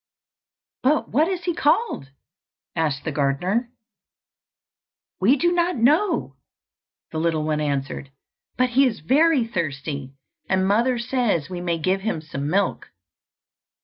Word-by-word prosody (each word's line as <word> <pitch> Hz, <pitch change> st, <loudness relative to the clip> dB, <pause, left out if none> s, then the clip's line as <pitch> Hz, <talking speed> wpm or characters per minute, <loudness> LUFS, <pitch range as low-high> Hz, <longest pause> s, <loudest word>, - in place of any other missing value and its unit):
"But 295 Hz, +4 st, +2 dB
what 300 Hz, +8 st, +3 dB
is 370 Hz, -1 st, -3 dB
he 350 Hz, -, 0 dB
called?" 310 Hz, -, +1 dB, 0.7 s
asked 150 Hz, -4 st, -1 dB
the 160 Hz, -, -2 dB
gardener. 175 Hz, -, 0 dB, 1.5 s
"We 220 Hz, +9 st, +5 dB
do 345 Hz, +5 st, +2 dB
not 350 Hz, 0 st, +1 dB
know," 295 Hz, -, +2 dB, 0.7 s
the 160 Hz, -, -3 dB
little 160 Hz, -1 st, 0 dB
one 155 Hz, 0 st, 0 dB
answered; 140 Hz, -1 st, -3 dB, 0.5 s
"but 255 Hz, +1 st, +3 dB
he 270 Hz, +2 st, +5 dB
is 225 Hz, -, -3 dB
very 280 Hz, -, +3 dB
thirsty, 145 Hz, -, -4 dB, 0.3 s
and 190 Hz, 0 st, +2 dB
mother 235 Hz, +5 st, +2 dB
says 235 Hz, -, 0 dB
we 175 Hz, -1 st, -4 dB
may 170 Hz, -1 st, -1 dB
give 185 Hz, +4 st, 0 dB
him 220 Hz, -5 st, -1 dB
some 145 Hz, -2 st, -5 dB
milk." 195 Hz, +3 st, 0 dB
195 Hz, 130 wpm, -23 LUFS, -, 1.5 s, We